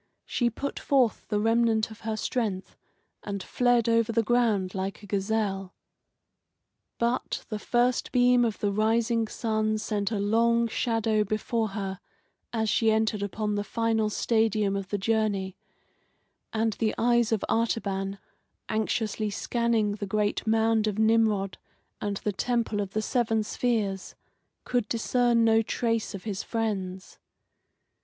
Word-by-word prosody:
She 240 Hz, -2 st, +1 dB
put 280 Hz, +5 st, -5 dB
forth 260 Hz, -5 st, +1 dB
the 210 Hz, -1 st, 0 dB
remnant 225 Hz, 0 st, +2 dB
of 220 Hz, -, -11 dB
her 220 Hz, -1 st, -3 dB
strength, 210 Hz, -5 st, -2 dB, 0.5 s
and 200 Hz, -2 st, -5 dB
fled 245 Hz, -2 st, +2 dB
over 230 Hz, -1 st, +3 dB
the 230 Hz, 0 st, +2 dB
ground 215 Hz, -5 st, +1 dB
like 195 Hz, +2 st, -4 dB
a -, -, -8 dB
gazelle. 195 Hz, -1 st, -1 dB, 1.2 s
But 235 Hz, +2 st, -1 dB
the 215 Hz, -, -3 dB
first 240 Hz, +2 st, +1 dB
beam 245 Hz, 0 st, +4 dB
of 225 Hz, -3 st, 0 dB
the 205 Hz, -, 0 dB
rising 225 Hz, +2 st, +1 dB
sun 215 Hz, -1 st, -1 dB
sent 210 Hz, -2 st, -2 dB
a 220 Hz, -, -2 dB
long 230 Hz, +3 st, +2 dB
shadow 225 Hz, -2 st, +1 dB
before 215 Hz, +2 st, -1 dB
her 195 Hz, -2 st, -4 dB, 0.5 s
as 220 Hz, -2 st, 0 dB
she 225 Hz, +1 st, +3 dB
entered 220 Hz, -1 st, +1 dB
upon 210 Hz, +1 st, -2 dB
the 205 Hz, 0 st, -1 dB
final 220 Hz, +1 st, 0 dB
stadium 215 Hz, -2 st, +1 dB
of 195 Hz, -1 st, -4 dB
the 205 Hz, -, -1 dB
journey, 200 Hz, -2 st, 0 dB, 1.0 s
and 225 Hz, 0 st, 0 dB
the 215 Hz, +1 st, -1 dB
eyes 235 Hz, -1 st, +3 dB
of 220 Hz, -3 st, 0 dB
Artaban, 200 Hz, -4 st, -1 dB, 0.5 s
anxiously 215 Hz, 0 st, -1 dB
scanning 230 Hz, 0 st, 0 dB
the 205 Hz, 0 st, -4 dB
great 210 Hz, +2 st, -1 dB
mound 220 Hz, 0 st, +3 dB
of 210 Hz, -1 st, -2 dB
Nimrod 220 Hz, -3 st, +2 dB, 0.4 s
and 205 Hz, -1 st, -2 dB
the 210 Hz, -, -2 dB
Temple 230 Hz, 0 st, 0 dB
of 195 Hz, -1 st, -5 dB
the 215 Hz, -, -1 dB
Seven 225 Hz, -3 st, +1 dB
Spheres, 210 Hz, -4 st, -1 dB, 0.5 s
could 245 Hz, -3 st, 0 dB
discern 235 Hz, 0 st, +2 dB
no 225 Hz, 0 st, +5 dB
trace 230 Hz, -1 st, -1 dB
of 190 Hz, -, -8 dB
his 205 Hz, -3 st, -3 dB
friends. 195 Hz, -5 st, -3 dB
220 Hz, 140 wpm, -27 LUFS, 205-230 Hz, 1.2 s, no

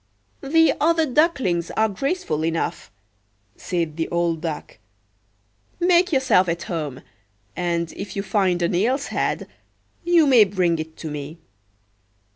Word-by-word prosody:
"The 325 Hz, +4 st, +3 dB
other 325 Hz, +1 st, +3 dB
ducklings 260 Hz, -, +1 dB
are 220 Hz, -, +4 dB
graceful 205 Hz, -, -2 dB
enough," 165 Hz, 0 st, -2 dB, 0.7 s
said 165 Hz, -3 st, -3 dB
the 165 Hz, -, -2 dB
old 170 Hz, -2 st, 0 dB
Duck. 160 Hz, -8 st, -6 dB, 1.0 s
"Make 355 Hz, +1 st, +3 dB
yourself 260 Hz, -, +3 dB
at 170 Hz, 0 st, -2 dB
home; 150 Hz, -6 st, -5 dB, 0.5 s
and 170 Hz, -2 st, -1 dB
if 200 Hz, -, -7 dB
you 200 Hz, -, -2 dB
find 185 Hz, -5 st, +1 dB
an 170 Hz, -, 0 dB
eel's 250 Hz, +10 st, 0 dB
head, -, -, -2 dB, 0.6 s
you 340 Hz, -2 st, +4 dB
may 255 Hz, -6 st, +7 dB
bring 180 Hz, -4 st, 0 dB
it 160 Hz, 0 st, -7 dB
to 155 Hz, -, -6 dB
me." 150 Hz, +2 st, -7 dB
180 Hz, 130 wpm, -22 LUFS, 165-275 Hz, 1.0 s, may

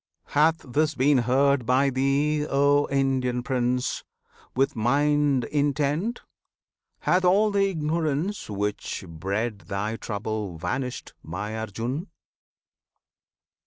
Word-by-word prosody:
] -, -, -54 dB
Hath 160 Hz, +3 st, +3 dB
this 150 Hz, +4 st, +1 dB
been 135 Hz, +1 st, +4 dB
heard 135 Hz, +2 st, +3 dB
by 135 Hz, +2 st, +3 dB
thee, 145 Hz, +3 st, +1 dB
O 140 Hz, +1 st, +3 dB
Indian 130 Hz, -3 st, 0 dB
Prince! 125 Hz, -1 st, -1 dB, 0.5 s
With 135 Hz, +2 st, +1 dB
mind 140 Hz, +3 st, +2 dB
intent? 145 Hz, -, 0 dB, 0.8 s
hath 185 Hz, +1 st, +2 dB
all 200 Hz, +4 st, +4 dB
the 200 Hz, -1 st, +2 dB
ignorance 160 Hz, -, -1 dB
Which 105 Hz, -1 st, -3 dB
bred 100 Hz, +7 st, -3 dB
thy 105 Hz, +3 st, -2 dB
trouble 105 Hz, -4 st, -4 dB
vanished, 125 Hz, +10 st, -4 dB
My 100 Hz, +6 st, -5 dB
Arjun? 115 Hz, -, -4 dB
135 Hz, 105 wpm, -25 LUFS, 115-150 Hz, 0.8 s, been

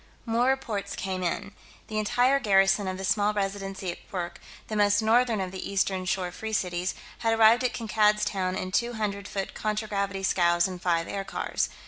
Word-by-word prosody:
More 235 Hz, +1 st, +2 dB
reports 225 Hz, -7 st, -1 dB
came 190 Hz, -1 st, -3 dB
in. 180 Hz, +3 st, -2 dB, 0.3 s
The 215 Hz, -1 st, -3 dB
entire 245 Hz, +5 st, +3 dB
garrison 195 Hz, -2 st, +3 dB
of 185 Hz, 0 st, -3 dB
the 190 Hz, -, -6 dB
small 205 Hz, +2 st, +2 dB
Residency 195 Hz, -2 st, -3 dB
at -, -, -10 dB
Kwurk, 175 Hz, -2 st, -4 dB, 0.3 s
the 215 Hz, -, -4 dB
most 205 Hz, +1 st, +3 dB
northern 230 Hz, 0 st, +3 dB
of 185 Hz, -1 st, -3 dB
the 190 Hz, -, -6 dB
eastern 190 Hz, -1 st, 0 dB
shore 180 Hz, -1 st, -1 dB
Free 220 Hz, +3 st, -6 dB
Cities, 180 Hz, -2 st, -1 dB, 0.2 s
had 225 Hz, -1 st, +1 dB
arrived 225 Hz, +3 st, +6 dB
at 250 Hz, -, 0 dB
Kankad's 210 Hz, -2 st, +2 dB
Town 185 Hz, -3 st, -1 dB
in 185 Hz, 0 st, -4 dB
two 235 Hz, +4 st, +1 dB
hundred 200 Hz, -3 st, -3 dB
foot 195 Hz, -1 st, -4 dB
contragravity 205 Hz, -2 st, -2 dB
scows 175 Hz, -2 st, +3 dB
and 180 Hz, -2 st, -7 dB
five 170 Hz, -2 st, +1 dB
aircars. 195 Hz, -1 st, -2 dB
200 Hz, 180 wpm, -27 LUFS, 190-220 Hz, 0.3 s, arrived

